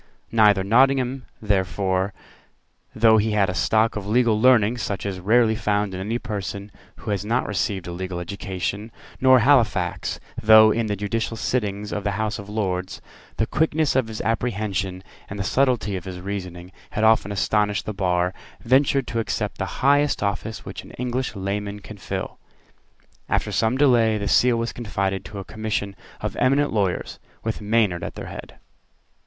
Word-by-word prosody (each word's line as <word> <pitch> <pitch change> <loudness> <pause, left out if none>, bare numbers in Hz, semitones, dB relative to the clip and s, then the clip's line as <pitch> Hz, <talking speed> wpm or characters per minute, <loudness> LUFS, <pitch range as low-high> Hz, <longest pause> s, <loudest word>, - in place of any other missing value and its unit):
Neither 105 -3 +4
Nottingham 130 +4 +2 0.2
therefore, 95 -1 0 0.8
though 110 -1 +5
he 110 0 +1
had 100 -3 +2
a - - -6
stock 110 +3 +2
of 105 -2 -5
legal 110 -1 +2
learning 120 -2 +4
such 100 -3 -3
as 100 -2 -3
is - - -9
rarely 110 +3 +4
found 105 -2 -1
in 90 - -5
any 110 +5 -2
person 100 -3 -5 0.2
who - - -6
has 100 -1 -1
not 115 +4 0
received 95 -1 -2
a 90 - -5
legal 90 0 -5
education, 100 +3 -4 0.3
nor 130 -1 +6
Halifax, 110 -9 +2 0.2
though, 110 0 +7
in 115 0 0
the 105 - -1
judicial 110 +3 -2
sittings 105 -4 -2
of 105 - -3
the 100 - -1
House 110 0 -2
of 100 0 -9
Lords, 95 -3 -2 0.4
the - - +2
quickness 155 -1 +1
of 130 -4 +2
his 110 -1 -5
apprehension 100 -5 -2 0.3
and 100 - -6
the 100 - -2
subtlety 120 -2 +1
of 90 - -6
his 90 -1 -6
reasoning 90 -2 -6 0.2
had 105 - -2
often 110 -2 +4
astonished 105 +2 0
the 105 - -4
bar, 90 -2 0 0.3
ventured 135 +2 +3
to 115 - -3
accept 115 - -3
the - - -5
highest 145 -1 +3
office 100 +2 -3
which - - -7
an - - -14
English 125 0 -2
layman 100 +1 -3
can 105 +1 -11
fill. 95 - -5 0.9
After - - 0
some 115 +3 +1
delay 120 -6 +4
the 100 -1 -3
Seal 120 +2 +4
was 115 0 -2
confided 100 -4 -2
to 105 - -8
a 95 - -6
commission 105 -2 -3 0.3
of - - -3
eminent 140 +1 +2
lawyers, 100 -4 -1 0.2
with 110 -1 -3
Maynard 105 -4 +1
at - - -6
their - - -7
head. - - -9
105 Hz, 170 wpm, -23 LUFS, 100-115 Hz, 0.9 s, though